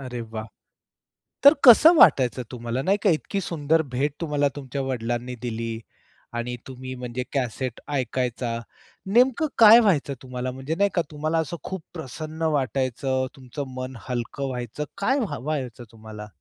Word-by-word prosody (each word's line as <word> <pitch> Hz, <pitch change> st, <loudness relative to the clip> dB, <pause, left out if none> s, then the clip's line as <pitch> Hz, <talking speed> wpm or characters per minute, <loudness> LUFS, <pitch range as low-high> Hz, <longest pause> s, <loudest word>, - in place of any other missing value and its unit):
अरे 125 Hz, -3 st, -6 dB
वाह! 110 Hz, -1 st, -6 dB, 1.0 s
तर 280 Hz, +2 st, +10 dB
कसं 310 Hz, +8 st, +9 dB
वाटायचं 130 Hz, -, +5 dB
तुम्हाला 120 Hz, +1 st, -3 dB
नाही 195 Hz, +7 st, +2 dB
का? 200 Hz, -, +4 dB
इतकी 185 Hz, +5 st, -1 dB
सुंदर 160 Hz, -2 st, +1 dB
भेट 140 Hz, +3 st, 0 dB
तुम्हाला 145 Hz, -3 st, +1 dB
तुमच्या 135 Hz, -1 st, -5 dB
वडिलांनी 125 Hz, -1 st, -3 dB
दिली 115 Hz, -1 st, -4 dB, 0.6 s
आणि 125 Hz, +1 st, -3 dB
तुम्ही 130 Hz, 0 st, -7 dB
म्हणजे 125 Hz, 0 st, -4 dB
कॅसेट 125 Hz, -2 st, -2 dB
ऐकायचा. 125 Hz, -2 st, -2 dB, 0.5 s
नेमकं 250 Hz, +8 st, +3 dB
काय 225 Hz, +1 st, +9 dB
व्हायचं 170 Hz, -11 st, +2 dB
तुम्हाला 125 Hz, 0 st, -4 dB
म्हणजे 135 Hz, +5 st, -4 dB
नाही 200 Hz, +3 st, +2 dB
का? 175 Hz, -, +2 dB
तुम्हाला 155 Hz, +2 st, -1 dB
असं 160 Hz, +2 st, -3 dB
खूप 190 Hz, -3 st, -5 dB
प्रसन्न 155 Hz, +1 st, -7 dB, 0.2 s
वाटायचं, 130 Hz, 0 st, -1 dB
तुमचं 130 Hz, 0 st, -7 dB
मन 130 Hz, 0 st, -5 dB
हलकं 125 Hz, +3 st, -3 dB
व्हायचं 125 Hz, +2 st, -4 dB
काय 265 Hz, +8 st, +1 dB
व्हा 225 Hz, -7 st, -2 dB
व्हायचं 130 Hz, -4 st, -4 dB
तुम्हाला? 110 Hz, -1 st, -10 dB
130 Hz, 145 wpm, -24 LUFS, 125-160 Hz, 1.0 s, तर